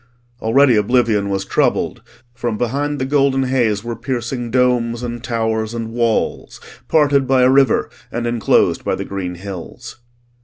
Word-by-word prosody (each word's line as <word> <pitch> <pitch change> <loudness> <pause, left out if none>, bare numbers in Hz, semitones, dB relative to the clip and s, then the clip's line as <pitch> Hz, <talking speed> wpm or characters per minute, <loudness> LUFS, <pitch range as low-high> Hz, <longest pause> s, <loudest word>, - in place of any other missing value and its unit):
Already 125 +3 +4
oblivion 105 -2 +2
was 95 -1 -2
troubled; - - 0 0.3
from 120 -3 -3
behind 140 +5 -1
the 130 - -2
golden 135 -1 +2
haze 120 -6 0
were 120 0 -4
piercing 120 0 -4
domes 120 -1 +1
and 120 -1 -5
towers 110 -2 -2
and 115 -1 -4
walls, 115 -1 -1 0.3
parted 145 -4 +3
by 130 -1 +3
a 125 - +5
river 135 -3 +3 0.2
and 120 0 -3
enclosed 120 -2 +2
by - - 0
the - - -5
green 95 -2 -5
hills. 95 +2 -9
120 Hz, 150 wpm, -18 LUFS, 110-130 Hz, 0.3 s, a